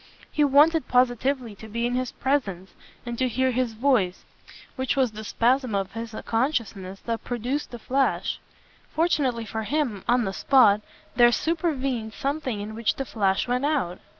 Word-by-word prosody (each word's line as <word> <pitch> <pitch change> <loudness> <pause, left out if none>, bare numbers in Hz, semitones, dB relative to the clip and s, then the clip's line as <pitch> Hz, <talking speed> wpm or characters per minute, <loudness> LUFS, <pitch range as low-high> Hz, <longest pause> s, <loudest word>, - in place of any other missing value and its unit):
He 300 - +2
wanted 295 +2 +4
positively 250 -1 +1
to 220 - -10
be 235 +2 -2
in 245 - -1
his 255 0 -1
presence 205 -10 -1 0.3
and 240 -1 -5
to 260 - +2
hear 260 +2 +1
his 250 -2 -1
voice 220 -7 +1 0.5
which 260 +2 -1
was 260 -4 +2
the 215 0 -8
spasm 245 +1 +1
of 195 -1 -1
his 230 -1 -6
consciousness 225 -6 -1
that 230 -1 -3
produced 245 +5 -3
the 240 - -7
flash. 265 +4 0 0.5
Fortunately 285 -8 0
for 220 +1 -4
him, 240 -5 -1
on 245 -1 +3
the 195 - -3
spot, 215 -4 +4 0.3
there 240 0 +6
supervened 275 -8 -1
something 275 -6 -2
in 210 +1 -6
which 225 0 0
the 270 - -3
flash 195 -4 0
went 250 +2 0
out. 255 - -1
245 Hz, 165 wpm, -25 LUFS, 220-270 Hz, 0.5 s, there